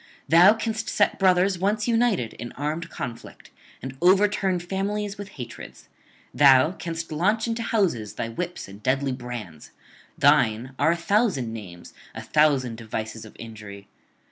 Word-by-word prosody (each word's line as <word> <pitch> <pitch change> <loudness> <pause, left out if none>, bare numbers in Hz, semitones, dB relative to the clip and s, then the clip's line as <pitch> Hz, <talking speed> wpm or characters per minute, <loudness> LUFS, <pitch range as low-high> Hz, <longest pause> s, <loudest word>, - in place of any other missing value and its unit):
Thou 180 +6 +7
canst 225 +1 -3
set 205 - +1
brothers 185 -1 +3
once 210 +3 0
united 225 - +1
in 120 +1 -7
armed 150 +4 -4
conflict, 120 -3 -8 0.3
and 130 0 -6
overturn 190 0 +3
families 200 +3 -3
with 200 -1 -7
hatreds; 120 -3 -10 0.4
thou 140 +2 +6
canst 165 -3 -6
launch 210 +8 +1
into 230 0 -2
houses 165 - 0
thy - - -3
whips 175 +9 -5
and 100 +2 -13
deadly 135 +4 0
brands; 120 - -7 0.5
thine 115 +5 +3
are - - +3
a - - -4
thousand 175 - 0
names, 90 -6 -10 0.2
a - - -5
thousand 140 -6 +2
devices 110 0 -6
of 110 - -14
injury. 105 -3 -10
155 Hz, 145 wpm, -24 LUFS, -, 0.5 s, Thou